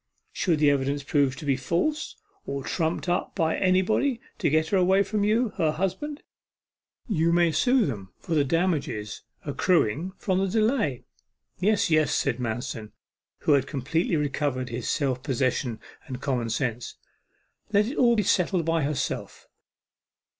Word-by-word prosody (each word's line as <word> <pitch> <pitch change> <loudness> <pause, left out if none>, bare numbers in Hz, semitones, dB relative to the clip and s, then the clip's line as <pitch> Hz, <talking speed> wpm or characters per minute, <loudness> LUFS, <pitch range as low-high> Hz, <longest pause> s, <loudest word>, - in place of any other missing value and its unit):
Should 170 -5 +1
the 150 -1 +4
evidence 140 +1 0
prove 140 -2 +1
to 150 - -9
be 140 -2 +2
false, 180 - -1 0.3
or 140 -1 -3
trumped 165 +3 -1
up 175 0 -1
by 160 -3 +1
anybody 195 +7 +2 0.2
to - - +2
get 155 +2 +2
her 200 - +2
away 190 +2 +4
from 205 +1 -1
you, 220 +3 +2
her 160 -5 +2
husband, 285 - -3 0.8
you 170 -7 +2
may 170 -1 +4
sue 245 - +3
them 100 - -5
for 170 - -5
the 150 -3 +4
damages 145 - -1 0.2
accruing 160 - +1
from 185 -2 0
the 195 - +1
delay.' 215 - +1 0.6
'Yes, 205 -2 +2
yes,' 155 -1 +3
said 130 -3 0
Manston, 120 -1 -4 0.5
who - - +1
had 140 -2 +3
completely 160 +6 -1
recovered 140 -3 -1
his 120 0 -4
self 130 -4 0
possession 130 -3 -1 0.3
and 130 -3 -6
common 125 -4 -1
sense; 120 -1 -2 0.8
'let 205 0 +4
it 255 +7 -5
all 235 -2 +5
be 210 - +2
settled 180 -2 +1
by 165 0 +1
herself. 140 -2 -3
155 Hz, 155 wpm, -26 LUFS, 135-190 Hz, 0.8 s, all